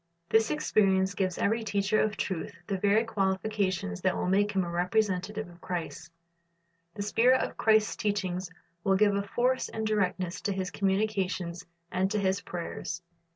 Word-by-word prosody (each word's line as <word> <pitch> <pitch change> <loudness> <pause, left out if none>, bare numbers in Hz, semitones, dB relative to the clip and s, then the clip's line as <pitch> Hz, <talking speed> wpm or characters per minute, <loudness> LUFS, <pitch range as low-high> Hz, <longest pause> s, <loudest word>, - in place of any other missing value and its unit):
This 220 +1 +4
experience 195 -10 +2
gives 185 -2 -1
every 225 +2 +1
teacher 200 0 +1
of 215 -1 0
truth 185 -4 -3
the 195 0 -2
very 205 +3 +4
qualifications 190 - -1
that - - +1
will - - -1
make 205 +2 +2
him 190 -1 +2
a 175 - -4
representative 195 +3 0
of 175 0 -16
Christ. 175 -1 -5 0.8
The 200 - -3
spirit 245 +5 +4
of - - -4
Christ's 220 -1 +3
teaching 190 -4 -1 0.4
will 195 -1 +3
give 205 +1 +4
a 200 - +1
force 250 +5 0
and 220 0 -3
directness 185 -4 0
to 200 - -1
his 185 -1 -3
communications 190 -3 -1 0.2
and 185 +1 +1
to 210 - -1
his 190 0 +1
prayers. 175 -1 -5
195 Hz, 160 wpm, -29 LUFS, 185-215 Hz, 0.8 s, This